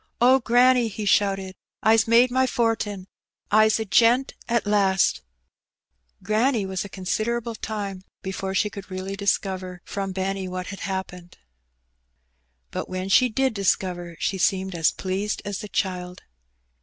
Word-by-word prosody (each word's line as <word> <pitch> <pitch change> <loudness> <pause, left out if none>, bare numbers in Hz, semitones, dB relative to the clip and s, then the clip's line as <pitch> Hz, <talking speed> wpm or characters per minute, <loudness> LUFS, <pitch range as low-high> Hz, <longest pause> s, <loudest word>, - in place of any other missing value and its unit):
''Oh, 255 +1 +5
granny," 245 +1 +4
he 215 0 -5
shouted, 195 -1 +1 0.3
"Ps 220 +1 +5
made 235 +2 +5
my 260 +1 +2
fortin! 220 -5 -1 0.5
Fs 215 +1 +5
a 220 - -2
gent 235 +7 +3 0.2
at 235 -2 +1
last! 195 -2 +2 1.0
'^ - - -23
Granny 220 +1 +1
was 190 -1 -3
a 200 - -9
considerable 225 +5 -2
time 205 -4 -5 0.2
before 190 0 -4
she 210 +2 +1
could 195 -2 -9
really 185 +1 -5
discover 190 -2 -2
firom 195 -1 -4
Benny 190 0 -2
what 185 0 -5
had 195 - -8
happened; 185 -2 -5 1.3
but - - -4
when 185 +1 -4
she 250 +5 +5
did 265 +2 0
discover, 180 -3 -1
she 190 - -1
seemed 190 0 +1
as 165 -3 +2
pleased 195 +3 -3
as 205 -1 -3
the 210 - -7
child. 180 -2 -3
195 Hz, 145 wpm, -24 LUFS, 190-225 Hz, 1.3 s, Oh